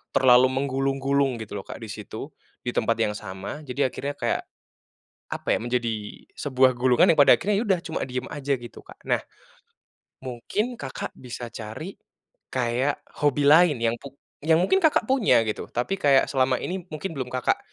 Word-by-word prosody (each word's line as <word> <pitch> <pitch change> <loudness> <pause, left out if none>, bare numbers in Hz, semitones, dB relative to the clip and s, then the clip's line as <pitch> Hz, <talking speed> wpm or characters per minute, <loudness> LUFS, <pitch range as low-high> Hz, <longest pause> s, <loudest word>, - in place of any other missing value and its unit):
terlalu 130 0 +6
menggulung-gulung 135 -1 0
gitu 105 -1 -7
loh - - -8
Kak - - -7
di 110 - -7
situ, 110 +5 -7 0.4
di 120 - 0
tempat 115 +1 +1
yang 105 -2 +1
sama, 100 +9 -7
jadi 130 0 0
akhirnya 140 +1 -4
kayak - - 0 0.9
apa - - -6
ya, - - -2
menjadi 120 -1 0 0.5
sebuah 130 -2 +3
gulungan 125 +2 +5
yang 155 - -3
pada 140 - +8
akhirnya 210 +1 0
ya - - -1
udah 190 -2 +3
cuma 165 -1 -4
diem 125 0 -4
aja 140 -1 -2
gitu 120 -1 -11
Kak. - - -15
Nah, - - +4 1.0
mungkin 205 - -3
Kakak 135 -2 -5
bisa 120 -1 -7
cari 115 - -7 0.6
kayak 130 +3 0 0.2
hobi 145 -1 +2
lain 160 0 +7
yang 115 0 +2
pu 140 -1 -11 0.3
yang 160 0 +4
mungkin 380 - +3
Kakak 315 -5 +4
punya 250 - +4
gitu, 105 - -3
tapi 125 +11 -1
kayak 140 -2 +4
selama 130 -1 +2
ini 185 -1 -4
mungkin 155 +5 -4
belum 130 -2 -3
Kakak 125 -1 +1
130 Hz, 175 wpm, -25 LUFS, 120-145 Hz, 1.0 s, pada